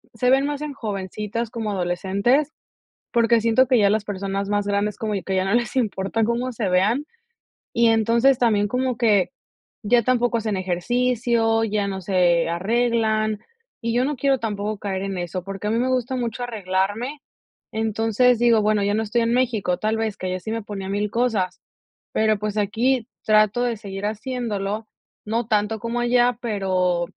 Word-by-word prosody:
se 250 Hz, +3 st, +2 dB
ven 270 Hz, +1 st, +4 dB
más 290 Hz, 0 st, -3 dB
en 300 Hz, -1 st, -4 dB
jovencitas 210 Hz, -1 st, -4 dB
como 230 Hz, -3 st, -3 dB
adolescentes, 200 Hz, -, +1 dB, 0.6 s
porque 235 Hz, -1 st, +3 dB
siento 230 Hz, +3 st, +3 dB
que 250 Hz, -1 st, +3 dB
ya 200 Hz, -2 st, +4 dB
las 210 Hz, 0 st, +1 dB
personas 195 Hz, -1 st, -3 dB
más 205 Hz, 0 st, 0 dB
grandes 205 Hz, 0 st, 0 dB
como 215 Hz, -2 st, -2 dB
yo, 190 Hz, -, -3 dB
que 190 Hz, -, -2 dB
ya 185 Hz, 0 st, +1 dB
no 195 Hz, +2 st, 0 dB
les 240 Hz, 0 st, 0 dB
importa 220 Hz, -3 st, 0 dB
cómo 235 Hz, +3 st, 0 dB
se 225 Hz, -4 st, -2 dB
vean, 210 Hz, +11 st, +2 dB, 0.7 s
y 235 Hz, 0 st, +3 dB
entonces, 230 Hz, +4 st, +3 dB
también 210 Hz, -4 st, +3 dB
como 250 Hz, +2 st, -1 dB
que 210 Hz, -6 st, +3 dB, 0.5 s
ya 235 Hz, +3 st, +4 dB
tampoco 245 Hz, -1 st, +2 dB
hacen 215 Hz, -3 st, -2 dB
ejercicio, 225 Hz, +4 st, +1 dB
ya 205 Hz, -2 st, -1 dB
no 190 Hz, -1 st, -4 dB
se 175 Hz, -3 st, +2 dB
arreglan. 220 Hz, +3 st, +1 dB, 0.4 s
Y 230 Hz, -1 st, -1 dB
yo 245 Hz, +1 st, +2 dB
no 295 Hz, +1 st, -1 dB
quiero 270 Hz, 0 st, +1 dB
tampoco 210 Hz, -2 st, -3 dB
caer 195 Hz, -2 st, -3 dB
en 195 Hz, -1 st, -3 dB
eso, 175 Hz, +1 st, -4 dB
porque 195 Hz, +2 st, -5 dB
a -, -, 0 dB
mí 225 Hz, -, +1 dB
me 255 Hz, +2 st, +1 dB
gusta 255 Hz, 0 st, 0 dB
mucho 240 Hz, -1 st, -3 dB
arreglarme. 210 Hz, +4 st, -2 dB, 0.5 s
Entonces, 225 Hz, +2 st, +2 dB
digo, 235 Hz, -2 st, +4 dB
bueno, 210 Hz, 0 st, +2 dB
ya 200 Hz, +1 st, +1 dB
no 220 Hz, -, 0 dB
estoy 225 Hz, +2 st, 0 dB
en 230 Hz, 0 st, +1 dB
México, 230 Hz, -8 st, +1 dB
tal 220 Hz, +1 st, -1 dB
vez, 220 Hz, -2 st, -2 dB
que 185 Hz, 0 st, -3 dB
ya 185 Hz, -, -2 dB
sí 220 Hz, -, -6 dB
me 225 Hz, -1 st, -3 dB
ponía 195 Hz, -2 st, -6 dB
1000 205 Hz, +1 st, -1 dB
cosas. 220 Hz, -7 st, 0 dB, 0.5 s
Pero, 215 Hz, -1 st, +2 dB
pues, 210 Hz, 0 st, -3 dB
aquí 225 Hz, +4 st, +1 dB, 0.2 s
trato 215 Hz, +2 st, +4 dB
de 240 Hz, -2 st, -1 dB
seguir 200 Hz, -1 st, -6 dB
haciéndolo, 215 Hz, -2 st, -3 dB, 0.4 s
no 225 Hz, +2 st, -1 dB
tanto 215 Hz, 0 st, +1 dB
como 235 Hz, +1 st, -3 dB
allá, 240 Hz, 0 st, +3 dB
pero, 185 Hz, -6 st, 0 dB
220 Hz, 180 wpm, -23 LUFS, 200-240 Hz, 0.7 s, ven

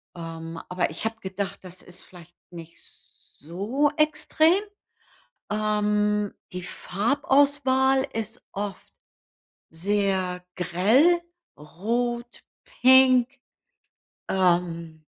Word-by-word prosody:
Ähm, 165 Hz, 0 st, -7 dB
aber 180 Hz, -2 st, -1 dB
ich 165 Hz, -, -6 dB
habe 225 Hz, 0 st, -3 dB
gedacht, 190 Hz, +1 st, -5 dB
das 180 Hz, 0 st, -11 dB
ist 180 Hz, +1 st, -11 dB
vielleicht 175 Hz, -1 st, -16 dB, 0.2 s
nicht 170 Hz, -1 st, -11 dB
so 205 Hz, -, -4 dB
extrem. 315 Hz, +4 st, +3 dB, 0.9 s
Ähm, 210 Hz, -1 st, 0 dB, 0.2 s
die 180 Hz, -, -4 dB
Farbauswahl 270 Hz, +5 st, +1 dB
ist 225 Hz, 0 st, -6 dB
oft 200 Hz, 0 st, -6 dB, 0.8 s
sehr 185 Hz, 0 st, -1 dB
grell, 220 Hz, -, +3 dB, 0.4 s
rot, 235 Hz, +10 st, -3 dB, 0.4 s
pink, 255 Hz, -1 st, +6 dB, 1.0 s
ähm, 170 Hz, -4 st, 0 dB
205 Hz, 85 wpm, -25 LUFS, 180-255 Hz, 1.0 s, pink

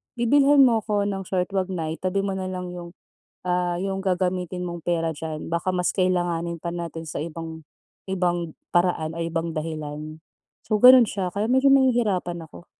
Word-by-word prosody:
bibilhan 275 Hz, +4 st, +5 dB
mo 235 Hz, -4 st, +4 dB
ako 205 Hz, -1 st, 0 dB
ng 195 Hz, -1 st, -2 dB
short, 185 Hz, 0 st, -1 dB
huwag 190 Hz, -1 st, 0 dB
na, 165 Hz, -4 st, -3 dB
itabi 185 Hz, +3 st, -1 dB
mo 195 Hz, -, -1 dB
na 190 Hz, -1 st, -3 dB
lang 180 Hz, -1 st, -5 dB
'yong 175 Hz, 0 st, -9 dB, 0.5 s
ah, 180 Hz, -1 st, 0 dB
'yong 195 Hz, 0 st, -2 dB
gagamitin 180 Hz, -1 st, -1 dB
mong 170 Hz, -1 st, -7 dB
pera 165 Hz, -2 st, 0 dB
diyan, 155 Hz, 0 st, -5 dB
baka 170 Hz, +3 st, -1 dB
mas 180 Hz, 0 st, +1 dB
kailanganin 175 Hz, -2 st, 0 dB
pa 170 Hz, -, -4 dB
natin 165 Hz, -1 st, -6 dB
sa -, -, -4 dB
ibang, 160 Hz, 0 st, -7 dB, 0.4 s
ibang 175 Hz, -3 st, -1 dB, 0.2 s
paraan, 175 Hz, -2 st, +1 dB
o -, -, -5 dB
ibang 165 Hz, 0 st, -2 dB
dahilan." 155 Hz, 0 st, -5 dB, 0.5 s
So, 215 Hz, -, +2 dB
gano'n 250 Hz, -2 st, +9 dB
siya, 185 Hz, -3 st, -3 dB
kaya 210 Hz, +3 st, -1 dB
medyo 265 Hz, +2 st, +5 dB
nahihirapan 215 Hz, -10 st, +2 dB
ako. 160 Hz, +2 st, -14 dB
180 Hz, 175 wpm, -24 LUFS, 165-195 Hz, 0.5 s, gano'n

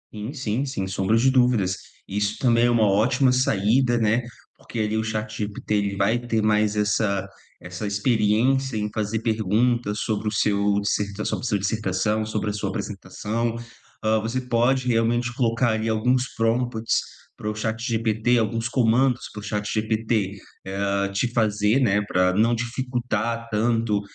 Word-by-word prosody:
Sim, 110 Hz, +5 st, -6 dB
sim, 130 Hz, -2 st, -2 dB
sem 115 Hz, -9 st, -3 dB
sombra 95 Hz, +2 st, 0 dB
de 130 Hz, +4 st, +4 dB
dúvidas. 120 Hz, -8 st, +2 dB, 0.3 s
Isso 100 Hz, +1 st, -1 dB
também 120 Hz, -2 st, +3 dB
é -, -, +3 dB
uma 115 Hz, -2 st, +3 dB
ótima 125 Hz, +7 st, +3 dB
saída, 120 Hz, 0 st, +2 dB
né, 115 Hz, +1 st, +2 dB, 0.4 s
porque 115 Hz, -, -7 dB
ali 110 Hz, 0 st, 0 dB
o 110 Hz, -, 0 dB
ChatGPT, 110 Hz, -1 st, -4 dB
ele 100 Hz, -1 st, 0 dB
vai 100 Hz, +5 st, +2 dB
ter 120 Hz, -2 st, -1 dB
mais 105 Hz, 0 st, +2 dB
essa 105 Hz, -2 st, 0 dB, 0.4 s
essa 90 Hz, +4 st, -6 dB
experiência 115 Hz, +5 st, +1 dB
em 105 Hz, -1 st, -1 dB
fazer 110 Hz, +1 st, -2 dB
perguntas 110 Hz, 0 st, 0 dB
sobre 110 Hz, 0 st, -2 dB
o -, -, +1 dB
seu 100 Hz, -1 st, +1 dB
dissertação 100 Hz, +2 st, -2 dB
seu 120 Hz, -4 st, +1 dB
dissertação, 105 Hz, +1 st, 0 dB
sobre 110 Hz, -1 st, -2 dB
a -, -, -2 dB
sua 105 Hz, -1 st, -3 dB
apresentação. 105 Hz, +3 st, -3 dB, 0.5 s
Hã, 110 Hz, 0 st, +2 dB
você 115 Hz, +4 st, -2 dB
pode 125 Hz, +1 st, +1 dB
realmente 120 Hz, 0 st, +1 dB
colocar 115 Hz, -1 st, +1 dB
ali 110 Hz, 0 st, -2 dB
alguns 125 Hz, +4 st, +1 dB
prompts 115 Hz, 0 st, +1 dB, 0.4 s
para 105 Hz, -, -4 dB
o 105 Hz, -, -3 dB
ChatGPT, 110 Hz, +1 st, 0 dB
alguns 115 Hz, +1 st, -1 dB
comandos 125 Hz, +1 st, +2 dB
para 105 Hz, -, -8 dB
o -, -, -9 dB
ChatGPT, 105 Hz, 0 st, -1 dB, 0.4 s
hã, 100 Hz, 0 st, 0 dB
te 100 Hz, +5 st, 0 dB
fazer, 110 Hz, 0 st, +2 dB
né, 105 Hz, -6 st, +2 dB
pra 90 Hz, -1 st, +2 dB
não 110 Hz, +5 st, +3 dB
dificultar 120 Hz, -1 st, -2 dB
tanto 110 Hz, -1 st, +1 dB
110 Hz, 150 wpm, -24 LUFS, 105-120 Hz, 0.5 s, de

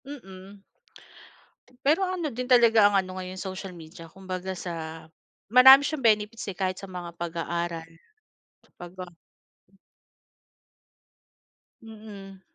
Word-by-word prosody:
Mm, 195 Hz, -7 st, -12 dB, 1.2 s
pero 315 Hz, +7 st, +2 dB
ano 365 Hz, -4 st, -3 dB
din 250 Hz, 0 st, -5 dB
talaga 235 Hz, -4 st, +5 dB
ang -, -, -5 dB
ano 185 Hz, 0 st, -9 dB
ngayon 185 Hz, 0 st, -7 dB
social 190 Hz, -1 st, -7 dB
media 165 Hz, 0 st, -12 dB
kumbaga 185 Hz, +2 st, -6 dB
sa, 165 Hz, -3 st, -7 dB, 0.4 s
marami 265 Hz, +4 st, +9 dB
siyang 285 Hz, -3 st, -3 dB
benefits, 215 Hz, 0 st, +1 dB
eh, -, -, -4 dB
kahit 185 Hz, -1 st, -2 dB
sa -, -, -8 dB
mga 175 Hz, -2 st, -8 dB
pag-aaral 170 Hz, -1 st, -4 dB, 0.9 s
pagka 180 Hz, +1 st, -9 dB, 2.7 s
Mm. 210 Hz, -3 st, -12 dB
190 Hz, 105 wpm, -26 LUFS, 175-225 Hz, 2.7 s, marami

